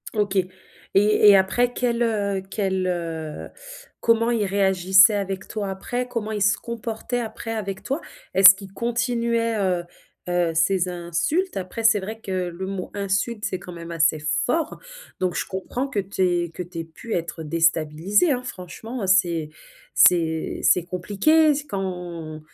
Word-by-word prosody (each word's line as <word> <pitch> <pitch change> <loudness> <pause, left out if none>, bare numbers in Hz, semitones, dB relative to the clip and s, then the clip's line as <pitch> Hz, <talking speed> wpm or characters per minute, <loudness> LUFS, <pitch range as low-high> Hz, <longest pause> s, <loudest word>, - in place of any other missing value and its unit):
OK 205 -1 0 0.6
et 210 +1 +5
et 200 - +8
après 240 +6 +2
quel, 240 -1 0
heu 200 -4 -1
quel, 190 -3 -1
heu 165 -3 -4 0.5
comment 230 0 +2
ils 220 -3 +1
réagissaient 190 +1 +4
avec 195 -1 -3
toi 205 -3 -4
après? 245 +6 -3
Comment 230 -3 -4
ils 210 -2 -3
se 200 +2 +3
comportaient 235 +1 -4
après 225 0 -5
avec 200 -4 -4
toi? 275 +4 -2 0.4
Est-ce 195 +1 +10
qu'ils 195 -1 -11
continuaient, 235 -1 0
heu 185 -3 0 0.5
heu, 175 -2 +1
ces 180 +3 +2
insultes? 175 - -1
Après 190 +4 -5
c'est 220 -2 +5
vrai 220 +4 -6
que 200 -4 -7 0.2
le 185 +3 -6
mot 195 -2 -5
insulte, 200 +2 -2
c'est 185 - -2
quand 180 0 -10
même 170 0 -8
assez 160 -1 +2 0.3
fort 320 +4 -1 0.4
donc 185 -1 0
je - - -2
comprends 220 +8 -4
que 220 -6 -2
tu 195 0 -4
aies 175 -2 +1
que 180 - -7
tu 175 -1 -7
aies - - -3
pu 165 +8 -6
être 170 -1 -4
déstabilisée, 165 - +2
hein. 250 -1 -1
Franchement, 225 +4 -7
heu, 195 - -2
c'est 170 -5 +2 0.5
c'est 165 -3 +3
c'est 180 - +4
compliqué 205 - +2
s 290 0 -1
quand 175 - -5
195 Hz, 160 wpm, -23 LUFS, 175-225 Hz, 0.6 s, Est-ce